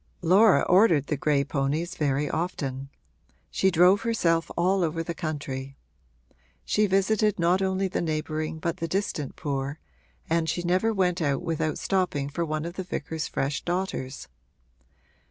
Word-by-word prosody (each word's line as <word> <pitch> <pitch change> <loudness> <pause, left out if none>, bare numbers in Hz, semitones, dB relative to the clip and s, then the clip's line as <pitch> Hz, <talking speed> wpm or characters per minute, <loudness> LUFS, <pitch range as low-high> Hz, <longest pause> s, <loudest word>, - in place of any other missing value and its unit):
Laura 190 +5 +6
ordered 180 -7 +4
the 150 - -1
gray 145 0 +1
ponies 150 +5 -1
very 145 -2 0
often: 140 -6 -3 0.6
she 190 - +2
drove 180 +3 +5
herself 170 -8 +1
all 185 +2 +2
over 165 0 -1
the 170 - -4
country. 140 -5 -5 0.9
She 210 0 +2
visited 200 +2 +2
not 175 +3 +2
only 190 0 0
the 185 - -2
neighbouring 155 -1 -2
but 165 +1 -3
the 165 - -3
distant 165 -6 -2
poor, 140 0 -3 0.5
and 165 0 +1
she 175 +3 -2
never 185 +6 +2
went 180 -4 0
out 145 0 0
without 160 -2 -1
stopping 180 -8 -1
for 170 +4 -2
one 155 -1 -2
of 170 +1 -7
the 190 - -2
vicar's 160 -3 -4
fresh 140 +1 -2
daughters. 175 -7 -3
165 Hz, 150 wpm, -26 LUFS, 150-185 Hz, 0.9 s, Laura